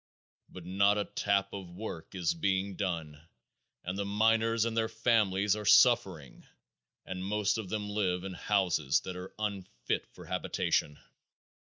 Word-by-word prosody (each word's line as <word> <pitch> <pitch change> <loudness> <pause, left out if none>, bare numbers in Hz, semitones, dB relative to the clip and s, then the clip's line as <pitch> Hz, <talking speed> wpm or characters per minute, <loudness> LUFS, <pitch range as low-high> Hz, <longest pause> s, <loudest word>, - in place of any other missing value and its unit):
But 90 -2 -11
not 100 +3 +3
a 105 - 0
tap 100 -1 0
of 95 -3 -7
work 95 -3 -7
is 85 -3 0
being 95 +3 -1
done, 80 -6 -3 0.6
and 90 +2 -4
the 100 - -2
miners 115 +2 +2
and 115 -1 -2
their 110 -1 +1
families 105 -3 +2
are 105 - -5
suffering, 105 - +3 0.6
and 95 0 -5
most 105 +2 0
of 100 -4 -6
them 105 -1 -3
live 95 -4 -1
in 95 -1 -5
houses 90 -7 +1
that 95 - -6
are 90 +1 -7
unfit 100 -3 -3
for - - -14
habitation. 75 0 -1
100 Hz, 150 wpm, -31 LUFS, 90-105 Hz, 0.6 s, not